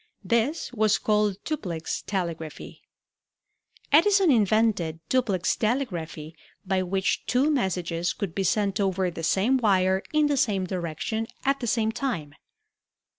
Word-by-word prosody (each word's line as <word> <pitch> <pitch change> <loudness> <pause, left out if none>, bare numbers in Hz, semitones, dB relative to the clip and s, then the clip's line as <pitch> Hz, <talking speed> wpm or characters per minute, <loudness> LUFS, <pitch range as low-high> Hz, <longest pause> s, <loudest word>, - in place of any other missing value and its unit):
This 240 +6 0
was 215 -3 +3
called 210 -2 +1
duplex 180 - -3
telegraphy. 170 -5 -5 1.1
Edison 380 +3 +5
invented 215 - +2
duplex 210 -9 +1
telegraphy 175 - -3 0.3
by 190 0 +1
which 190 +1 -1
two 270 +5 +2
messages 180 - -1
could 195 -5 -4
be 195 - -1
sent 200 0 +1
over 190 -2 0
the 165 - -7
same 195 +10 +2
wire 190 -5 +2
in 305 -1 +3
the 290 -1 +1
same 200 -6 +1
direction 185 +5 -3 0.2
at 275 0 +2
the 240 - -4
same 220 -1 +1
time. 170 - -3
200 Hz, 125 wpm, -26 LUFS, 180-245 Hz, 1.1 s, Edison